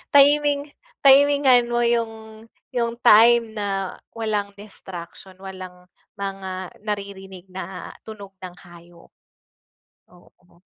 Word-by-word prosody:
timing 290 0 +4 0.3
timingan 275 -2 +6
mo 240 0 0
yung 225 -2 -2 0.3
yung 235 -2 -1
time 230 +1 +6
na 195 -2 -3 0.2
walang 210 -3 -2
distraction, 190 -2 -10
walang 185 -2 -10 0.3
mga 190 -2 -5 0.2
naririnig 195 -2 -6
na 185 -1 -7 0.2
tunog 200 -3 -11
ng 180 - -10
hayop. 175 -1 -17 1.0
Oo. 175 0 -24
200 Hz, 95 wpm, -22 LUFS, 185-235 Hz, 1.0 s, timingan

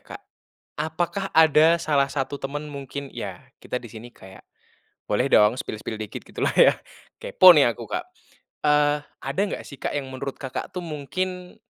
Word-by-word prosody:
Kak, - - -11 0.6
apakah 170 +5 -2
ada 160 +1 +6
salah 145 -5 +1
satu 140 0 -3
temen 145 +2 -5
mungkin 140 0 -7
ya - - -8
kita - - -6
di 120 -3 -6
sini 115 +2 -10
kayak 95 0 -15 0.6
boleh 115 +6 +1
dong 105 +3 +5
spill-spill 110 -2 -5
dikit 110 -1 -6
gitu - - -3
lah - - +1
ya, - - +7 0.4
kepo 180 -3 +7
nih 120 -5 +5
aku, - - -10
Kak. 355 +1 -3 0.6
Eee, 150 0 +3 0.2
ada 140 +9 -2
nggak 205 - -4
sih 140 - -10
Kak - - -4
yang 140 -2 -3
menurut 130 +1 -6
Kakak 135 -2 -5
tuh 180 - -5
mungkin 180 +3 -5
145 Hz, 170 wpm, -24 LUFS, 130-160 Hz, 0.6 s, ya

